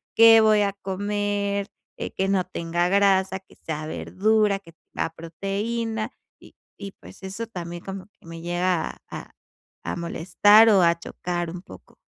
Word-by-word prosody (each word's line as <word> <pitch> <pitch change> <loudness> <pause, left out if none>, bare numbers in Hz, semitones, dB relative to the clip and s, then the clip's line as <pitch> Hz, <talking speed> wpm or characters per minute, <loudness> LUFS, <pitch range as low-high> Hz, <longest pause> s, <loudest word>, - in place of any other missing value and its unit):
qué 225 0 +8
voy 215 -1 +4
a 200 -1 +1
comer, 200 +1 -2 0.3
eh, - - -5
que 190 - -1
no 195 -1 +2
tenga 175 -1 -1
grasa, 190 -1 +3
que 190 - -23
sea 155 -1 -5
verdura, 210 +4 +1
que 170 -4 -17 0.2
tenga - - -1
proteína. 210 +7 -3 0.3
Y - - -18 0.2
y, 200 -1 -7
pues, 195 - -16
eso 195 +4 -5
también 175 -4 -7
como 195 -1 -7
que 205 - -27
me 165 0 -8
llega 175 0 -1
a - - -8 0.5
a - - -2
molestar 190 +6 +4
o 195 -4 +5
a 170 0 +4
chocar 175 0 -4
un 175 +1 -7
poco. - - -15
195 Hz, 160 wpm, -24 LUFS, 175-205 Hz, 0.5 s, qué